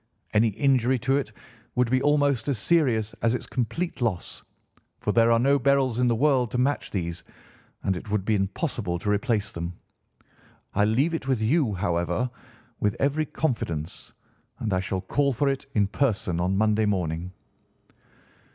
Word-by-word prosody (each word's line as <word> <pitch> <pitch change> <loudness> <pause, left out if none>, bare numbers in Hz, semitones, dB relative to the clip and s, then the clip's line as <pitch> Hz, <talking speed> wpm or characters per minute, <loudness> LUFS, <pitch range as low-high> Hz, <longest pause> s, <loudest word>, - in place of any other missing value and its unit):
Any 110 +2 +4
injury 130 +2 +2
to 130 +3 +1
it 140 - -3 0.4
would 125 -1 +2
be 130 0 +3
almost 145 -3 +2
as 140 -4 0
serious 115 -6 +2
as 115 +1 +2
its - - -4
complete 130 +7 -3
loss, 110 -7 -2 0.6
for 105 - -1
there 115 +1 +4
are 115 - +5
no 140 +4 +3
beryls 135 -2 +2
in 125 - +3
the 120 - +2
world 130 -1 +2
to 125 - -3
match 135 +3 0
these, 85 -2 -4 0.6
and 95 - +1
it 95 +4 -7
would 105 -2 -1
be 110 - +2
impossible 95 - -1
to 105 +4 -1
replace 105 0 0
them. 85 +1 -5 1.0
I 105 +1 +3
leave 130 +10 +2
it 155 -5 -3
with 130 -4 +1
you, 115 - +2
however, 90 +5 -1 0.5
with 105 -1 +1
every 145 +2 +1
confidence, 85 - -3 0.5
and 105 -3 -2
I 90 - +2
shall 95 0 -2
call 140 +8 +1
for 140 +4 0
it 135 -1 -1
in 105 -2 +4
person 100 -6 0
on 90 +2 +1
Monday 110 0 +2
morning. 90 -3 -1
115 Hz, 170 wpm, -26 LUFS, 100-135 Hz, 1.0 s, are